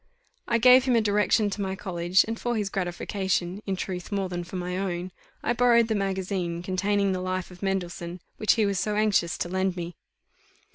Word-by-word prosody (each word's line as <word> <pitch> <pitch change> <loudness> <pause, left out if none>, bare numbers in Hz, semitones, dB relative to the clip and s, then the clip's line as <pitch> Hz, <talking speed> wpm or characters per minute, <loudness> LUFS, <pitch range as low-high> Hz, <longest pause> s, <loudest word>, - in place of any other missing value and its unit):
I 235 - +3
gave 250 +2 +7
him 255 -2 +3
a - - +5
direction 210 0 +2
to 205 - -4
my 190 -1 -2
college, 180 -2 +1
and 225 0 -4
for 240 0 -1
his 205 -2 -2
gratification, 190 0 -2
in 195 - 0
truth, 180 0 -5
more 195 -2 -1
than 175 -1 -3
for 180 +2 -9
my 180 0 -3
own, 185 -1 -3 0.3
I 240 - +1
borrowed 235 -1 +4
the - - +2
magazine 190 -3 -2
containing 195 +2 +1
the 185 -1 -2
life 185 0 -3
of 180 - -14
Mendelssohn, 180 -2 -3 0.2
which 215 - +3
he 220 -2 +2
was 200 -2 0
so 210 +1 -1
anxious 210 -6 +2
to - - -2
lend 190 +1 0
me. 175 -1 -5
190 Hz, 200 wpm, -26 LUFS, 180-210 Hz, 0.3 s, gave